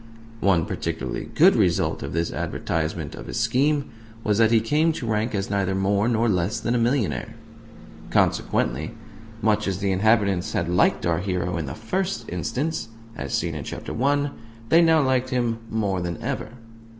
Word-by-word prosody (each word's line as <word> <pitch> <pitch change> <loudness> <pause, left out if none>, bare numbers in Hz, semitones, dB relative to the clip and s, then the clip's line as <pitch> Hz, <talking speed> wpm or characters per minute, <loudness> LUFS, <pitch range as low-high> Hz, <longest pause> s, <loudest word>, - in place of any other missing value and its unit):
One 90 -6 +3
particularly 65 -1 -4
good - - +6
result - - +1
of 70 - -5
this 85 +2 -1
advertisement 80 -2 -2
of - - -9
his - - -3
scheme 140 +5 +1 0.3
was 105 0 +1
that 110 -1 +5
he 115 -1 +5
came 150 +9 +2
to 130 - -5
rank 110 0 0
as 100 0 -2
neither 95 -1 0
more 100 +2 +1
nor 115 -1 +2
less 90 -1 0
than 120 - -1
a 120 - +2
millionaire. 115 - 0 0.7
Consequently, 75 - +1 0.5
much 105 -1 +2
as 95 -2 -1
the 100 0 0
inhabitants 100 -2 +2
had 85 - 0
liked 90 +1 +2
our 85 0 +1
hero 90 -2 -2
in 80 -4 -3
the - - -5
first 185 - -2
instance 125 - -2 0.3
(as 70 -2 -5
seen 85 -1 -1
in 75 -2 -5
Chapter - - -6
I.), 145 0 +2 0.4
they 165 - +6
now 160 -2 +5
liked 130 -1 +1
him 120 -3 0
more 100 -4 -1
than 85 -1 -4
ever. - - -3
105 Hz, 175 wpm, -24 LUFS, 90-120 Hz, 0.7 s, good